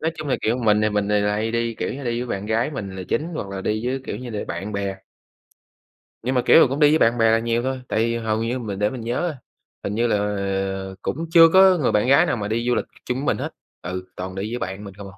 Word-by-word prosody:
Nói 160 +1 -1
chung 155 -2 -5
là, - - +2
kiểu, 115 +3 +1
mình 105 -3 +3
thì 110 - +2
mình 105 0 0
thì 105 0 +2
là 105 0 +1
hay 110 +2 -1
đi, 115 -1 -1
kiểu - - -3
như, 140 -1 -7
đi 120 0 -1
với - - -5
bạn 100 0 -3
gái 115 +6 0
mình 100 -9 -6
là 95 - -5
chính - - +1
hoặc 100 -10 -4
là 95 -1 -5
đi 110 +4 -2
với, 135 +1 -1
kiểu - - -4
như 125 +1 -7
là, 105 -2 -4
bạn 95 +5 -4
bè. 100 -1 -2 1.3
Nhưng 130 +2 -1
mà, 125 - +3
kiểu, 165 - +7
cũng 135 +4 -3
đi 150 - +6
với 155 - +5
bạn 120 - -6
bè 115 -1 +4
là 115 - +4
nhiều 115 +1 0
thôi, 130 -1 -2
tại 110 - -1
vì 115 +1 +1
hầu 110 -1 -1
như 120 +3 -2
mình 100 -5 -5
để 105 - +2
mình 125 0 -6
nhớ, 140 +8 -2 0.5
hình 105 - -3
như 120 +1 +2
là, 115 - +2
ờ, 95 -1 -2
cũng 160 +5 -3
chưa 165 -1 +9
có 190 -1 +7
người 140 - +1
bạn 105 +3 +2
gái 140 +6 +6
nào 120 -8 -1
mà 100 - -3
đi 115 +2 -1
du 125 - +3
lịch - - -1 0.2
chung 125 - -2
với 140 - -3
mình - - +1
hết, - - -3 0.3
ừ, 90 0 -5
toàn 95 +1 -6
đi 100 +3 -4
với 120 - -3
bạn 95 +1 -5
mình 100 -2 -9
không 100 0 -10
à. 95 - -16
115 Hz, 295 wpm, -22 LUFS, 100-125 Hz, 1.3 s, chưa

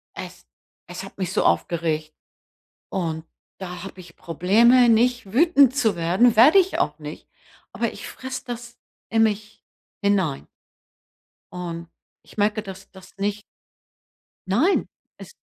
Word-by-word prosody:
es - - -9 0.4
es 180 +2 -7
hat 195 - -12
mich 185 -1 -3
so - - +1
aufgeregt. 155 -2 0 0.8
Und 160 -3 -3 0.3
da 180 -1 -7
habe 190 -1 -10
ich 175 - -15
Probleme, 230 +9 +4
nicht 235 -2 +2
wütend 280 -2 +5
zu 220 -8 +2
werden 185 +8 +3
werde 295 - +7
ich 380 +1 +2
auch - - -1
nicht. - - -9 0.4
Aber - - -2
ich - - -9
fresse 260 0 -7
das 240 0 -7 0.3
in 225 -1 +2
mich 215 0 -2 0.4
hinein. 190 -8 0 1.1
Und 170 -2 -6 0.4
ich - - -19
merke, 210 +1 +1
dass 195 -1 -11
das 190 -1 -15
nicht 205 +1 -2 1.1
Nein, 265 - +2 0.3
es - - -12
200 Hz, 130 wpm, -23 LUFS, 180-240 Hz, 1.1 s, werde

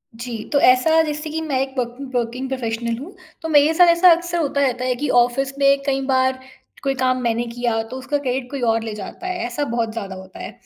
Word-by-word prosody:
जी, 230 -1 -6
तो 285 - +4
ऐसा 280 +6 +5
जैसे 300 0 -3
कि 320 - -3
मैं 285 -5 -1
एक 270 - -2
पकिन 245 +2 -3
वर्किंग 245 +2 -2
प्रोफेशनल 235 -2 -2
हूँ, 335 +9 -10 0.3
तो 325 - -4
मेरे 300 +1 +5
साथ 355 +1 +6
ऐसा 340 +1 +6
अक्सर 345 +1 +1
होता 280 -2 0
रहता 255 -2 0
है 255 -1 0
कि 290 +4 -3
ऑफ़िस 265 +3 -1
में 275 0 +4
कई 270 -1 0
बार 260 0 +2 0.4
कोई 275 -1 +1
काम 255 -1 0
मैंने 235 0 0
किया, 235 -1 -1
तो 250 +4 -8
उसका 275 +3 -2
क्रेडिट 260 -2 -3
कोई 275 -3 -4
और 225 -1 +1
ले 220 -2 -5
जाता 210 - -8
है, 365 -1 -3
ऐसा 245 +5 -2
बहुत 230 -2 -2
ज़्यादा 200 -4 -5
होता 190 0 -12
है। - - -6
260 Hz, 230 wpm, -21 LUFS, 235-290 Hz, 0.4 s, साथ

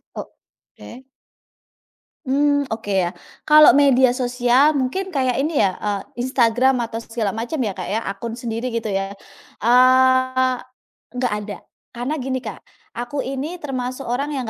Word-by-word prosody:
Oke. 175 - -13 1.2
Mmm, 285 +1 +2
oke 220 -2 -7
ya. 185 -3 0 0.3
Kalau 305 0 +8
media 265 -3 +5
sosial 250 +3 +2
mungkin 305 +8 -2
kayak 260 -3 0
ini 295 +2 +1
ya, 185 -2 +1
eee, 210 +4 -4
Instagram 250 0 +2
atau 230 -1 -4
segala 225 -2 -3
macam 235 +8 -4
ya 210 -5 -1
Kak 180 - -5
ya, 220 +3 -2
akun 225 +3 -5
sendiri 235 +1 -4
gitu 230 -2 -2
ya. 195 0 -2 0.5
Eee, 260 +1 +4 0.6
enggak 250 -2 -1
ada. 205 - -7 0.4
Karena 250 +6 -3
gini 260 -1 -3
Kak, 220 -5 -9 0.3
aku 245 +4 -3
ini 285 +7 -5
termasuk 255 -2 -5
orang 280 +5 -2
yang 255 -5 -3
250 Hz, 140 wpm, -21 LUFS, 230-270 Hz, 1.2 s, Kalau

